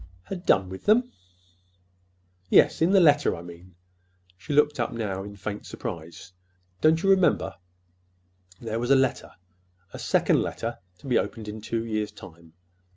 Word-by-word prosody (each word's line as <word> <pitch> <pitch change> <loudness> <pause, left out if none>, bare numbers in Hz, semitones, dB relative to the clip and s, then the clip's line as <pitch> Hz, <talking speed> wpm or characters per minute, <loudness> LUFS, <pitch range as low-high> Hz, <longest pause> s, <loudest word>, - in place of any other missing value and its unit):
"Had 180 - -8
done 95 -1 +4
with 95 +1 -9
them!" 240 +4 +3 1.4
"Yes, - - +4
in 165 - +4
the 195 0 +5
letter, 145 -4 +4
I 85 - -9
mean." 85 +1 -13 0.6
She 100 - -9
looked 150 -1 +3
up 120 - -1
now 100 -5 -3
in 100 +1 -9
faint 100 +1 -6
surprise. 85 -5 -8 0.5
"Don't 160 +1 +3
you 195 - +2
remember? 180 - +2 1.0
There 115 -1 -4
was 120 +1 -3
a 140 - +6
letter—a 90 -8 -4
second - - +2
letter - - -4 0.2
to 115 - -13
be 125 - +3
opened 110 -2 -5
in 105 +1 -7
two 115 +1 -3
years' 110 -2 -2
time. 85 -5 -14
105 Hz, 155 wpm, -26 LUFS, 90-145 Hz, 1.4 s, a